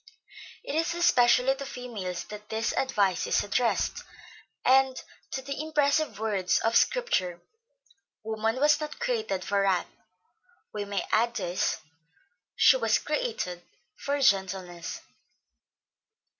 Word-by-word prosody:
It - - -5
is 330 +2 0
especially 260 -6 +4
to 270 - -7
females 225 -9 -5
that 210 0 -11
this 220 +1 -1
advice 200 -9 +1
is - - +2
addressed, 230 +3 0 0.6
and 265 0 +4 0.3
to 265 - -4
the 280 +2 -4
impressive 305 -2 +1
words 205 -4 0
of 225 +1 +1
Scripture, 185 - +1 0.8
'woman 220 +1 -1
was 295 +2 +4
not 300 -1 -5
created 455 - -2
for 200 0 +1
wrath,' 190 -3 +2 0.9
we 205 -1 -3
may 200 0 -2
add 235 +2 +2
these, 175 -5 -1 0.8
'she - - +6
was - - +2
created 435 - -3 0.3
for 285 0 -2
gentleness.' 190 -6 0
235 Hz, 115 wpm, -28 LUFS, 195-285 Hz, 0.9 s, she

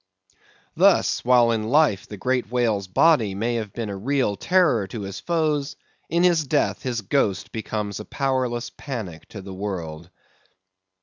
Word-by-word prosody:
Thus, - - +3
while 120 -1 +5
in 115 -1 0
life 145 -8 +3
the 105 - -8
great 125 0 -1
whale's 115 -6 0
body 110 - +3
may 115 +4 -1
have 110 -3 -3
been 115 -2 -4
a - - -4
real 125 0 0
terror 150 - +2
to 110 +2 -6
his 95 -1 -6
foes, 155 -4 -1 0.3
in 170 +2 +2
his 175 -3 +4
death 145 +2 +1
his 120 -3 -2
ghost 100 -2 0
becomes 105 -2 -4
a 105 - -7
powerless 130 -3 -1
panic 110 - -6
to 100 -2 -9
a 95 - -6
world. 85 -5 -5
115 Hz, 160 wpm, -23 LUFS, 100-135 Hz, 0.3 s, while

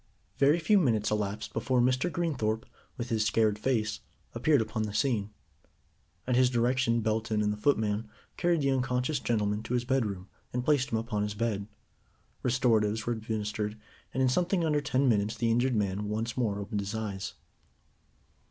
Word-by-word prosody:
Very 145 +4 +5
few 200 +5 +4
minutes 110 - +1
elapsed 105 0 -2
before 125 +3 +1
Mr. 130 +7 +2
Greenthorpe, 130 -10 -1 0.3
with 120 0 -4
his 110 -1 +1
scared 105 0 +2
face, 110 -3 0 0.3
appeared 140 +5 +3
upon 110 0 -2
the 105 -1 -3
scene. 105 -3 +1 1.0
At 125 - +1
his 125 0 +5
direction 120 -1 +2
Belton 110 0 0
and 105 0 +1
the - - -7
footman 110 -3 +1 0.3
carried 175 -3 +1
the 140 -1 +2
unconscious 130 +2 0
gentleman 105 -3 0
to 125 - -3
his 120 0 0
bedroom, 105 -8 -1 0.3
and 125 0 -2
placed 145 -3 +2
him 115 - +1
upon 110 -2 -2
his 105 0 -2
bed. 105 -3 -1 0.7
Restoratives 115 -4 +2
were 120 - 0
administered 105 -1 -3 0.3
and 130 - 0
in 130 - +4
something 175 +5 +1
under 150 -2 +2
ten 135 -1 +1
minutes 105 -1 +2
the 115 0 +1
injured 120 +2 +2
man 100 -1 -1
once 110 +2 -2
more 110 -6 0
opened 100 0 -3
his 100 +2 -4
eyes. 100 -3 -4
115 Hz, 170 wpm, -29 LUFS, 105-130 Hz, 1.0 s, Very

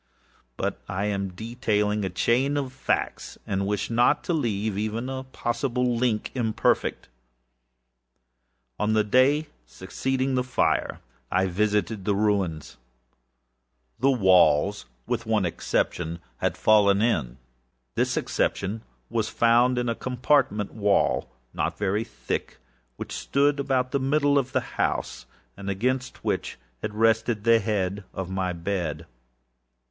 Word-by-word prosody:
But - - -2
I 95 +2 -1
am 100 -2 -1
detailing 105 0 -1
a 95 - -1
chain 125 +10 +1
of 135 -2 -3
factsâand 100 -6 -2
wish 105 +2 -2
not 120 +5 +3
to 175 - -1
leave 110 -8 -1
even 110 +4 -2
a 130 0 -5
possible 125 -1 -1
link 115 -3 0
imperfect. 115 -4 0 1.7
On 105 +1 +1
the 110 -1 +3
day 130 +8 +3 0.2
succeeding 130 +7 -2
the 125 -1 +1
fire, 125 +1 0 0.3
I 95 +1 +2
visited 105 +2 0
the 105 - +2
ruins. 100 -9 0 1.2
The 135 +4 +3
walls, 95 - +4 0.2
with 115 - -2
one 110 -4 +2
exception, 85 -1 -1 0.2
had 90 -2 -1
fallen 100 0 +4
in. 70 - 0 0.6
This - - 0
exception 100 +3 -1 0.3
was 115 -2 -1
found 120 +2 +3
in 125 0 0
a 115 - +1
compartment 125 -4 +1
wall, 105 -2 +1 0.2
not - - -2
very 100 +2 0
thick, - - -5 0.4
which - - -7
stood 145 +1 +1
about 130 -2 0
the 140 - +1
middle 140 +1 +3
of 130 -1 -3
the - - +1 0.2
house, - - -2 0.3
and 100 0 -6
against 125 +6 -2
which - - -2 0.2
had 105 0 -4
rested 115 0 +2
the 115 0 +5
head 100 -2 -1
of 95 -1 -4
my 95 -1 -1
bed. 85 -3 -3
110 Hz, 130 wpm, -25 LUFS, 100-125 Hz, 1.7 s, the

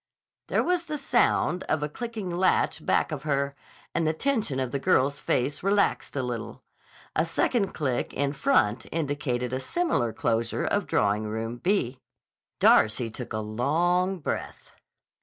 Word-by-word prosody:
There - - +1
was 355 -1 0
the 305 -2 -3
sound 240 - +2
of 155 -1 0
a - - 0
clicking 225 +4 -5
latch 175 -2 +1
back - - +1
of 150 -3 -3
her, 140 -1 0 0.4
and 165 -2 +1
the 155 - +2
tension 215 - 0
of 130 -2 -2
the 140 - -1
girl's 140 -3 +2
face 140 +4 0
relaxed 200 -4 +1
a 135 - 0
little. 120 -2 -5 0.5
A - - +3
second 210 -6 0
click 130 -5 -1
in 140 0 -1
front 125 - +2
indicated 140 -6 -2
a 130 - 0
similar 135 - 0
closure 115 +1 -1
of - - 0
Drawing 105 +1 +1
Room 110 +2 -4
B. 135 - 0 0.6
Darcy 110 +1 +4
took 125 +2 -7
a 110 - -2
long 170 - +1
breath. 155 - -5
145 Hz, 155 wpm, -27 LUFS, 120-185 Hz, 0.6 s, Darcy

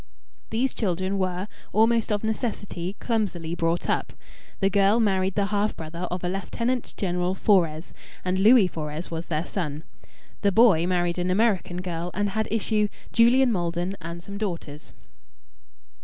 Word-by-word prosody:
These 240 +4 0
children 190 -1 -1
were, 185 +1 -1 0.2
almost 225 +1 +3
of 205 0 0
necessity, 205 -5 -3
clumsily 190 -8 -1
brought 170 0 0
up. - - -1 0.5
The 195 -1 +2
girl 200 +3 +4
married 190 -3 +1
the 200 - +2
half 205 +1 0
brother 170 +3 -5
of 180 +1 -4
a - - 0
Lieutenant 230 +7 -2
General 180 -1 0
Fores, 170 -6 +2 0.3
and 185 +1 0
Louis 215 0 +7
Fores 155 0 -5
was 165 +1 -4
their 160 +1 -1
son. 155 -6 -4 0.6
The 200 - +3
boy 195 -6 +5
married 175 -1 0
an 180 +1 0
American 185 -3 +1
girl, 175 -1 -3
and 205 +1 0
had 220 +2 -1
issue, 215 -1 +1 0.3
Julian 245 +2 +5
Maldon 175 0 -1
and 170 +1 -7
some 200 +1 -7
daughters. 170 -7 -5
190 Hz, 150 wpm, -25 LUFS, 175-215 Hz, 0.6 s, Louis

